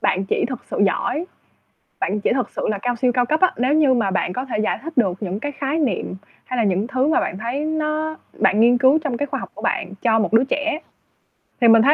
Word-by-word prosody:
bạn 190 +1 +1
chỉ - - +1
thật 255 -3 -6
sự - - -3
giỏi, 260 - -1 0.7
bạn 210 - -1
chỉ - - +1
thực 255 0 -1
sự - - -3
là 210 - 0
cao 245 +2 0
siêu 245 +1 +1
cao 245 0 +2
cấp 310 +5 +1
á, 370 - +5
nếu 255 +4 +2
như 300 -4 +4
mà 225 -6 +1
bạn 180 -1 -1
có 255 +5 -3
thể 250 -5 -3
giải - - 0
thích 330 +2 -6
được 200 -7 +3
những 195 +1 -3
cái 290 +3 -4
khái 285 +2 -2
niệm 235 - -1 0.3
hay 255 - -4
là 235 - +2
những 200 +2 +1
thứ 260 +1 0
mà 315 - +3
bạn 185 - -3
thấy 235 +6 -3
nó 310 0 -1 0.2
bạn 205 0 +2
nghiên 240 +2 +5
cứu 265 +5 +5
trong 255 -5 -2
cái 285 - -1
khoa 285 - -4
học - - -7
của - - -11
bạn 190 - -1
cho 225 -1 +3
một 215 - -1
đứa 230 +2 +6
trẻ. 305 +2 -1 0.8
Thì 235 - +6
mình 225 0 +7
thấy, 285 +5 +6
250 Hz, 260 wpm, -21 LUFS, 220-290 Hz, 0.8 s, mình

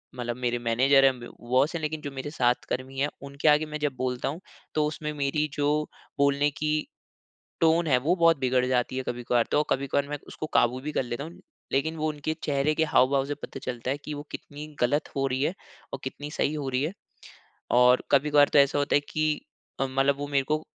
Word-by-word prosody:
मतलब 120 -1 -3
मेरे 120 -1 0
मैनेज़र 130 +4 +4
हैं 130 -2 +3
ब 120 - -10
बॉस 130 +6 +2
है - - -1
लेकिन 155 0 -3
जो 145 - -5
मेरे 135 +1 -5
साथ 125 -4 +1
कर्मी 130 +1 -4
हैं 145 - +2 0.2
उनके 140 +2 -2
आगे 150 +1 +5
मैं 150 0 -5
जब 145 -2 -1
बोलता 125 -1 -2
हूँ 155 +5 -5 0.4
तो 155 -1 +3
उसमें 150 0 -4
मेरी 150 +1 0
जो 145 -1 0 0.5
बोलने 140 +1 +3
की 150 +2 -2 0.9
टोन 165 0 +4
है 130 - +4
वो 160 +7 +1
बहुत 165 -3 +4
बिगड़ 130 -1 +2
जाती 130 0 0
है 130 - -2
कभी-कभार। 120 -1 0
तो 150 - +4
कभी-कभार 140 +1 0
मैं 145 - -3
उसको 155 - -6
काबू 125 +2 +3
भी 150 - -4
कर 140 - 0
लेता 120 +2 -4
हूँ। 165 +3 -10 0.3
लेकिन 160 +4 0
वो 155 0 0
उनके 150 +1 -3
चेहरे 145 +1 +1
के 160 - +2
हाव-भाव 135 -2 +3
से 145 +1 -3
पता 145 - -8
चलता 125 0 -4
है 140 - -1
कि 150 - -4
वो 145 0 -6
कितनी 150 +1 -8
गलत 145 +5 +1
हो 135 0 +1
रही 130 0 -1
है 165 - 0 0.4
और 135 - -3
कितनी 145 +3 -6
सही 150 - 0
हो 145 -3 -3
रही 130 +1 0
है। 160 +6 -2 0.8
और 125 +1 +5
कभी-कभार 145 +1 +5
तो 145 - +7
ऐसा 140 0 +4
होता 145 0 +1
है 145 - +4
कि 155 -1 0 0.4
अ, 135 - +2
मतलब 135 +1 +1
वो 145 0 -4
मेरे 140 -1 +1
को 155 0 -1
140 Hz, 220 wpm, -27 LUFS, 130-150 Hz, 0.9 s, तो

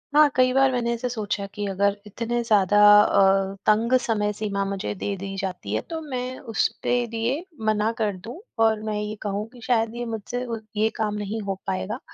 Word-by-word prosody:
हाँ, 300 0 +7
कई 255 0 +4
बार 270 0 +4
मैंने 240 -2 0
ऐसे 235 +2 -3
सोचा 210 -4 -3
कि 205 -1 -3
अगर 200 +1 +1
इतने 235 +3 -2
ज़्यादा 205 -3 +3 0.2
अ, 195 -1 +3
तंग 225 +3 +3
समय 215 -4 0
सीमा 200 -1 -2
मुझे 195 +1 -3
दे 200 +1 -3
दी 195 +1 -6
जाती 185 - -4
है 110 - 0
तो 325 - -3
मैं 255 -3 -4
उसपे 220 - 0
दिए 235 +7 -2 0.2
मना 215 0 +2
कर 210 -3 0
दूँ 230 - -9 0.3
और 220 -1 +2
मैं 215 -1 -2
ये 210 0 -4
कहूँ 205 +1 -3
कि 245 - -14
शायद 225 -2 +1
ये 240 0 -3
मुझसे 230 +2 -4 0.3
ये 220 +1 +3
काम 215 -1 -1
नहीं 210 +2 -3
हो 195 - -1
पाएगा। 95 0 -2
215 Hz, 195 wpm, -24 LUFS, 200-240 Hz, 0.3 s, हाँ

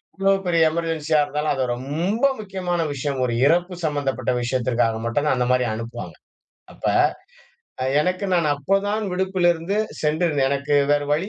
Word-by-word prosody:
எவ்வளோ 195 0 +2
பெரிய 170 -2 +3
எமர்ஜென்ஸியா 160 -1 0
இருந்தாலும் 150 +1 -2
அது 130 - 0
ரொம்ப 165 - -1
முக்கியமான 185 -4 -2
விஷயம். 140 -1 -3
ஒரு 125 -2 0
இறப்பு 175 +4 +2
சம்மந்தப்பட்ட 135 -5 -1
விஷயத்திற்காக 120 -2 0
மட்டும் 120 +6 0
தான் 150 - +2
அந்த 125 -1 0
மாரி 125 0 +3
அனுப்புவாங்க. 115 +2 -6 0.6
அப்ப - - -17 1.0
அ - - 0 0.2
எனக்கு 185 +5 -1
நான் 170 -3 +2
அப்போதான் 195 +8 0
விடுப்பிலிருந்து 180 -1 +1 0.3
சென்றிருந்தேன். 150 -3 +1
எனக்கு 140 +1 0 0.2
வேறு 145 0 +1
வழி 170 +7 0
150 Hz, 145 wpm, -22 LUFS, 135-180 Hz, 1.0 s, பெரிய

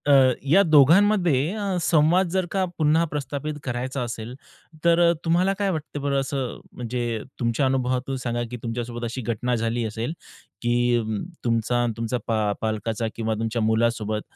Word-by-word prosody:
अ, 145 - +6 0.4
या 195 +4 +7
दोघांमध्ये 165 0 +4
अ, 200 -3 -1
संवाद 165 +4 +3
जर 190 0 +1
का 195 -1 +1
पुन्हा 155 +1 +3
प्रस्थापित 145 0 -4
करायचा 130 +1 -3
असेल 115 0 -5 0.5
तर 170 0 +5
अ, - - +5
तुम्हाला 175 +4 +3
काय 200 -1 +1
वाटतं 150 -3 -5
बरं 140 -1 +1
असं 135 -2 -3
म्हणजे 120 -2 -3 0.2
तुमच्या 115 +3 +1
अनुभवातून 130 0 0
सांगा 120 -1 -1
की 125 - -4
तुमच्यासोबत 120 0 -4
अशी 120 +3 -4
घटना 120 +2 -1
झाली 115 +1 -1
असेल, 110 +6 -3 0.5
की 120 0 +2 0.4
तुमचा 120 +1 +1
आणि 120 -1 -1
तुमचा 115 +2 -1
पा 110 -2 +1
पालकाचा 110 0 -2
किंवा 110 -1 -1
तुमच्या 115 +1 -2
मुलासोबत 110 -1 +1
125 Hz, 155 wpm, -24 LUFS, 115-150 Hz, 0.5 s, या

